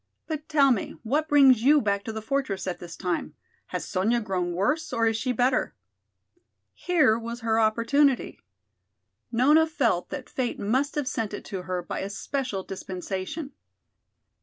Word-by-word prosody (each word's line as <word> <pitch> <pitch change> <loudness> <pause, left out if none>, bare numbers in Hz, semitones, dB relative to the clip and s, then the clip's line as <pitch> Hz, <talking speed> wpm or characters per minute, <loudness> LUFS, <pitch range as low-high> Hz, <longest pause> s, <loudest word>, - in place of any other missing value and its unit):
But 310 -2 -5
tell 280 -3 +5
me 225 - -1
what 295 +7 0
brings 270 -5 +6
you 290 +5 +6
back 200 -4 0
to 225 - -3
the 220 0 -6
fortress 240 -7 -2
at 185 -2 -3
this 175 -1 -9
time? 180 -2 -3 0.3
Has - - -4
Sonya 215 +5 +1
grown 185 -4 -2
worse 250 - 0
or 230 0 +1
is 225 0 +2
she 255 +3 -1
better?" 250 +2 +1 1.0
Here 300 -11 +2
was 235 +1 -6
her 225 0 +1
opportunity. 235 +5 +2 0.9
Nona 295 +7 +4
felt 235 - 0
that 285 -3 -6
fate 255 -2 -2
must 260 +8 0
have 295 -3 -1
sent 225 -7 -2
it - - -9
to 190 -2 -5
her 180 -1 -3
by - - -4
a 195 - -4
special 230 -1 -3
dispensation. 190 - -5
230 Hz, 160 wpm, -26 LUFS, 200-280 Hz, 1.0 s, brings